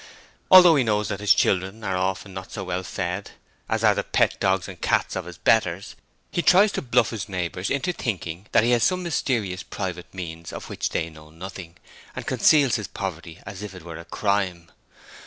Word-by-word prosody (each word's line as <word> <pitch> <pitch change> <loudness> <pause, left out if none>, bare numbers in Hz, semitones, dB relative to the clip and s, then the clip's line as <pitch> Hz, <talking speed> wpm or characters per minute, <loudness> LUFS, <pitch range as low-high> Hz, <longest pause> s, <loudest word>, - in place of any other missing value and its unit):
Although 180 -4 +9
he 135 - +3
knows 105 -2 0
that 100 -2 -3
his 105 0 +2
children 95 +4 0
are 95 -3 -1
often 95 +1 -2
not 95 0 -8
so 100 - -5
well 90 0 -2
fed 95 +1 -4 0.4
as - - 0
are - - +6
the - - -2
pet - - +1
dogs 95 -1 +1
and 95 -3 -10
cats - - +1
of 95 -2 -3
his 90 -1 -10
'betters', 95 -2 +1 0.4
he 175 - 0
tries 195 +4 +5
to - - -3
bluff 120 -2 +2
his 110 -3 -5
neighbours 90 0 -3
into 175 +6 0
thinking 95 - -4
that - - +4
he 120 - +2
has 120 -2 +3
some 185 -1 +2
mysterious 115 - -1
private 90 -3 -6
means 85 -3 -7
of - - -8
which - - -2
they 80 0 -2
know 75 0 -15
nothing, 85 +1 -9 0.4
and - - -6
conceals 140 -7 +4
his 105 -4 -5
poverty 85 -5 -6
as 95 0 -8
if 105 -3 -7
it 90 - -11
were 85 -1 -8
a 85 - -10
crime. 90 -2 -1
95 Hz, 205 wpm, -24 LUFS, 90-110 Hz, 0.4 s, Although